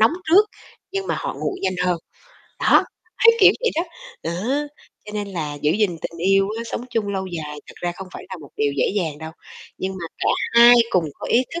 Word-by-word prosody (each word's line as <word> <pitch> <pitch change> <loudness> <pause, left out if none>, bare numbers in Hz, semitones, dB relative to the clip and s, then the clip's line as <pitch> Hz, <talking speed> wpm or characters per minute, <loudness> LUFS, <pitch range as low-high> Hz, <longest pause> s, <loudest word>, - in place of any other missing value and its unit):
nóng 220 +6 +5 0.2
trước, 405 +5 +7 0.4
nhưng 390 0 -3
mà - - 0
họ - - -4
nguội 385 - -4
nhanh 190 -1 0
hơn. 175 -1 +1 0.6
Đó, - - +5 0.3
hay 455 - +7
kiểu - - +8
vậy 475 -2 +2
đó, 330 - +2 0.4
đó, - - -2 0.7
cho 210 - -9
nên 205 -1 -3
là 160 -6 -4
giữ 150 - +3
gìn 200 -3 +1
tình 170 - -6
yêu 195 0 +4
á, - - -3
sống 235 - -5
chung 225 -4 -1
lâu 190 -1 -2
dài 155 -4 -6
thật - - -13
ra 175 0 -1
không 190 +1 -9
phải - - -8
là 185 - -6
một 145 - -12
điều 145 -1 +1
dễ - - +2
dàng 160 -7 -1
đâu, 160 +1 -7 0.5
nhưng 190 0 -2
mà 170 - -5
cả - - 0 0.3
hai 235 +1 +9 0.2
cùng 180 -3 +2
có - - -7
ý 245 - +4
thức 340 - -3
190 Hz, 230 wpm, -22 LUFS, 170-230 Hz, 0.7 s, hai